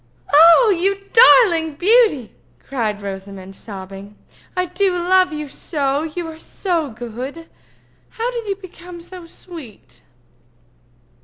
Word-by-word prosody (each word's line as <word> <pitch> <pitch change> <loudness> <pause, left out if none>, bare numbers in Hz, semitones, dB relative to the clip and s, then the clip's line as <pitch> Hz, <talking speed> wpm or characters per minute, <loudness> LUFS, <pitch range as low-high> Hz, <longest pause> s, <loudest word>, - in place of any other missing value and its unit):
"You 390 +2 0
darling 345 -10 +6
beauty!" 385 - +2 0.3
cried 215 -6 -4
Rosamond, 195 -1 -8
sobbing. 195 0 -10 0.4
"I 365 - +1
do 365 +1 -1
love 370 +1 +2
you 300 -1 -5
so, 280 0 -2
you 325 +2 -5
are 320 0 -10
so 335 -4 -3
good. 245 +8 -8 0.6
How 470 +2 -4
did 470 -3 -6
you 395 - -1
become 360 -2 -12
so 350 0 -11
sweet?" 225 - -13
320 Hz, 110 wpm, -19 LUFS, 230-370 Hz, 0.6 s, darling